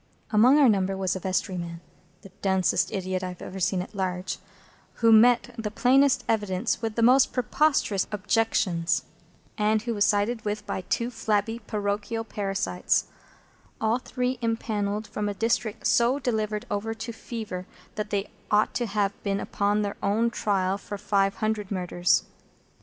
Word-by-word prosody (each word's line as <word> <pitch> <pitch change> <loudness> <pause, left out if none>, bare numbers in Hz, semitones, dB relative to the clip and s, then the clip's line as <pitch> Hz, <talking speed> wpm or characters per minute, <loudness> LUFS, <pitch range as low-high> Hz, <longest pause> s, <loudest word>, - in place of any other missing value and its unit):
Among 240 +6 +6
our 290 -3 +6
number 195 -3 +2
was 190 -1 0
a - - -3
vestryman,—the 180 -1 -5
densest 190 -2 +2
idiot 185 -2 -2
I 185 - -3
have 180 -1 -8
ever 190 - -7
seen 180 0 +1
at - - -13
large,—who 190 +4 -3
met 240 +2 +5
the 215 -1 -2
plainest 255 +3 +3
evidence 205 0 0
with 225 -2 -3
the 230 - +1
most 255 +3 +5
preposterous 250 -6 +1
objections, 205 -4 +1 0.6
and 215 +1 +2
who 235 0 -2
was 205 -2 +2
sided 215 +2 +1
with 210 0 -3
by 190 - -3
two 235 +6 -2
flabby 220 0 -1
parochial 210 +1 -2
parasites; 195 -4 -1 0.7
all 220 +2 +1
the - - -27
three 250 -1 -1
impanelled 215 -2 -1
from 210 0 -3
a 205 - -4
district 225 0 -1
so 240 +3 +3
delivered 215 -5 -2
over 220 +2 -2
to 225 +2 -6
Fever 215 -6 -6 0.3
that 210 0 -4
they 200 -1 -2 0.2
ought 210 +1 +3
to 240 - -1
have 200 -1 -1
been 200 -1 -1
upon 205 +1 0
their 200 0 -3
own 220 +4 +1
trial 195 -3 0
for 205 +1 -6
five 195 -1 +1
hundred 215 -2 -2
Murders. 180 -2 +1
210 Hz, 155 wpm, -26 LUFS, 195-225 Hz, 0.7 s, Among